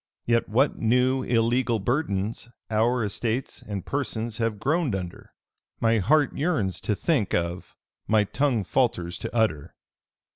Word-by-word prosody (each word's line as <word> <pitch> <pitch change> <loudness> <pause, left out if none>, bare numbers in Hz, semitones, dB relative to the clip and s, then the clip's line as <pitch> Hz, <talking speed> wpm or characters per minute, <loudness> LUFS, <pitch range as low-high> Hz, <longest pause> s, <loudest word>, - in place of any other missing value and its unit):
Yet 115 0 +1
what 130 +7 +2
new 125 +3 +2
illegal 120 0 +1
burdens 110 -2 -2 0.2
our 115 +3 +2
estates 115 +4 -2
and 100 -3 -6
persons 120 -5 -3
have 115 -2 -1
groaned 145 - 0
under, 90 -2 -7 0.5
my 115 -1 +3
heart 145 +8 +3
yearns 140 - 0
to 105 - 0
think 125 - 0
of, 85 +1 -3 0.3
my 110 -1 +4
tongue 125 0 0
falters 90 -6 0
to - - -5
utter. 90 -11 0
115 Hz, 135 wpm, -26 LUFS, 105-130 Hz, 0.5 s, my